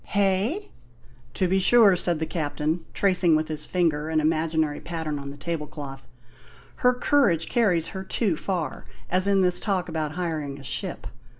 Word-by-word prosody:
"Hey?" 205 - 0 0.6
"To 185 - +1
be 190 +2 +2
sure," 205 0 +6
said 175 -1 0
the 160 - -2
Captain, 155 +1 -2
tracing 180 -4 +4
with 155 0 -1
his 150 -1 -2
finger 160 -4 0
an 160 -1 +1
imaginary 155 -1 0
pattern 160 -3 -4
on 140 0 -7
the 140 - -9
table 150 +1 -4
cloth, 135 -3 -9 0.7
"her 250 0 +3
courage 205 - +2
carries 180 -9 +1
her 190 -1 -6
too 190 -2 0
far 165 -4 -4 0.3
as 185 +2 +1
in 200 -1 +3
this 180 -1 +5
talk 195 -4 -1
about 155 -2 -3
hiring 155 -5 -3
a - - -12
ship. - - -3
165 Hz, 170 wpm, -25 LUFS, 155-190 Hz, 0.7 s, sure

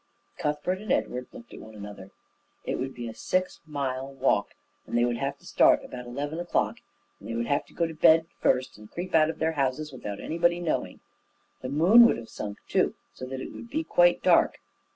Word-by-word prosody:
Cuthbert 150 +5 -1
and 215 - -4
Edward 125 0 -1
looked 115 - -13
at - - -9
one 110 0 -12
another. 100 -2 -9 0.6
It - - -2
would 135 +1 -4
be 120 -1 -5
a 115 - -6
six 185 +9 -1
mile 135 -2 -3
walk, 130 -6 0 0.3
and - - -1
they 120 - +4
would 120 -1 -1
have 140 +3 -2
to - - -22
start - - +4
about 125 -1 -8
eleven 145 +6 -4
o'clock, 175 - 0 0.4
and - - -10
they 115 - -3
would 115 0 -1
have 140 +3 0
to - - -20
go 170 - +1
to 165 - -5
bed 160 +1 +5
first 130 -3 +1
and 105 0 -13
creep 180 +2 -6
out 155 -1 +5
of 160 - -4
their 160 0 +1
houses 140 0 -1
without 105 -5 -6
anybody 170 +1 +1
knowing. 170 -3 -2 0.6
The 130 - -4
moon 185 - +7
would - - +1
have 115 -1 -9
sunk, 105 -1 -6
too, - - +1 0.2
so 130 - -8
that 130 0 -5
it - - -7
would 235 - -10
be 315 +5 -1
quite - - +3
dark. - - +4
140 Hz, 215 wpm, -27 LUFS, 120-165 Hz, 0.6 s, moon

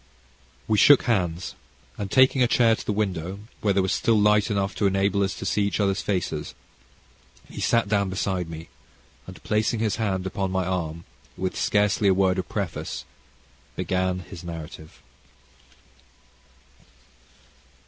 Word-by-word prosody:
We 105 - +2
shook 145 -2 +7
hands, 90 -6 -1 0.4
and, 100 -1 -5
taking 130 +3 +4
a 125 - +5
chair 115 -1 +4
to - - -8
the - - -2
window, 95 -3 -2 0.2
where 105 - +2
there 95 -1 +2
was 95 - 0
still 115 -2 +2
light 105 +1 +3
enough 100 -1 -1
to 100 - +2
enable 100 +1 +1
us 95 -1 0
to - - -7
see 105 - +1
each 100 +1 0
other's 100 -2 +1
faces, 90 -6 -3 0.9
he - - -8
sat 115 -3 +2
down 100 -2 +1
beside 95 -2 -2
me, 80 0 -8 0.6
and, 95 - -11
placing 110 +1 0
his 110 -1 0
hand 95 -5 -1
upon 95 0 -2
my 95 0 -1
arm, 85 -3 -3 0.3
with 95 0 -2
scarcely 105 0 +2
a 95 - +4
word 95 -1 +2
of 90 - -5
preface - - -4 0.7
began 90 0 -1
his 90 -1 -11
narrative. 80 -2 -9
95 Hz, 150 wpm, -25 LUFS, 90-105 Hz, 0.9 s, shook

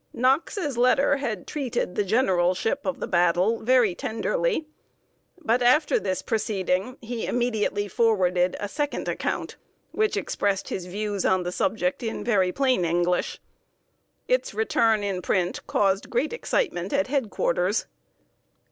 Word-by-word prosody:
Knox's 275 - 0
letter 275 +3 +4
had 230 -9 -4
treated 265 -10 -3
the 210 - 0
generalship 190 +3 +1
of 280 - -2
the - - -2
battle 180 +4 +2
very 240 -4 +3
tenderly. 410 - -1 0.7
But 250 -6 +1
after 255 +6 +4
this 185 -2 -2
proceeding 210 +1 -1
he 235 0 -4
immediately 220 -4 0
forwarded 185 -4 +2
a 205 - -3
second 290 +6 -3
account, - - -3 0.3
which 430 0 0
expressed 200 -1 -1
his 180 -1 -4
views 205 +1 -3
on 185 -1 +2
the 175 - -3
subject 270 +9 -1
in 225 -2 -4
very 195 -6 +2
plain 260 -4 +1
English. 175 +1 0 0.9
Its - - 0
return 230 - +2
in 195 -3 -2
print 180 0 0
caused 195 -1 +1
great 250 - 0
excitement 200 - -1
at 280 +1 +2
head 265 -5 -1
quarters. - - 0
225 Hz, 135 wpm, -25 LUFS, 185-270 Hz, 0.9 s, letter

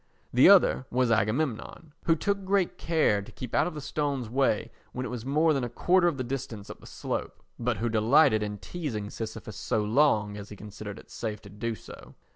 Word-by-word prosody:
The 125 +8 +7
other 185 -9 +5
was 125 -1 +1
Agamemnon, 120 +7 -1
who 165 - +4
took 200 +5 -1
good 190 -1 0
care 155 -11 +2
to 100 - -12
keep 125 - -8
out 155 - +3
of 175 - -6
the 150 - -5
stone's 140 -4 -2
way 130 -4 +1 0.2
when 130 0 -3
it - - -4
was 125 0 -6
more 155 +3 +3
than 135 -3 -1
a 120 - -2
quarter 180 +7 +3
of 165 -5 0
the 130 - -2
distance 120 -5 -5
up - - -11
the - - -14
slope, - - -5 0.2
but 120 -1 0
who 120 - -1
delighted 110 +1 +4
in 105 0 -3
teasing 105 - -5
Sisyphus 110 -2 -6
so 105 - 0
long 105 -3 +2
as 100 0 -8
he 105 - -9
considered 105 0 -8
it - - -15
safe 110 -2 -4
to 100 - -13
do 110 +2 -3
so. - - -13
120 Hz, 215 wpm, -28 LUFS, 110-150 Hz, 0.2 s, The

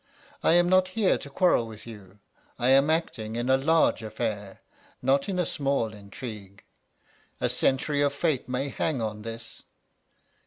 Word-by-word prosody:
I - - +4
am 175 0 +5
not 185 0 +4
here 210 -4 +4
to 140 - -9
quarrel 140 -6 +2
with 110 -1 -11
you. 105 -4 -12 0.4
I 125 - +1
am 135 +3 +5
acting 115 -9 -1
in 120 +2 0
a - - +6
large 160 +2 +3
affair, 110 -2 -4 0.4
not 135 +6 +1
in 190 - -1
a 180 - +1
small 135 -8 -1
intrigue; 100 -1 -9 0.8
a - - +1
century 145 +2 +1
of 145 -1 +3
fate 145 -3 -1
may 130 +2 -1
hang 140 0 -1
on 110 -2 -3
this. 115 +1 -8
130 Hz, 160 wpm, -27 LUFS, 110-145 Hz, 0.8 s, a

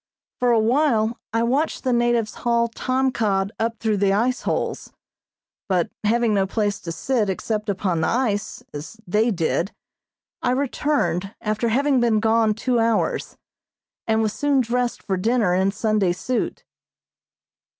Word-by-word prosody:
For 250 - +2
a 235 - +4
while 235 -1 +2
I 230 +1 +1
watched 275 +7 0
the 255 -2 +1
natives 240 -2 +1
haul 235 -1 +2
tom 260 +3 0
cod 200 -4 0
up 230 0 -1
through 215 -2 0
the 195 0 +2
ice 240 +5 +1
holes, - - -2 0.8
but 180 -3 +1
having 230 +1 +2
no 195 -1 +2
place 205 0 -1
to 165 - -6
sit 225 +3 0
except 210 +2 -2
upon 185 -4 0
the - - +1
ice, 220 -4 -1
as 150 +9 -8
they 215 +6 +2
did, 175 0 0 0.7
I 250 - +1
returned 260 - -1
after 215 +2 -1
having 270 +3 +2
been 230 -3 +3
gone 220 0 +2
two 240 +2 0
hours, 225 -1 0 0.7
and 220 0 +2
was 215 -1 0
soon 285 -2 +2
dressed 245 0 -1
for 190 -2 -1
dinner 220 -1 +2
in 190 +2 +2
Sunday 210 -3 +1
suit. 245 +7 -3
225 Hz, 150 wpm, -22 LUFS, 205-240 Hz, 0.8 s, a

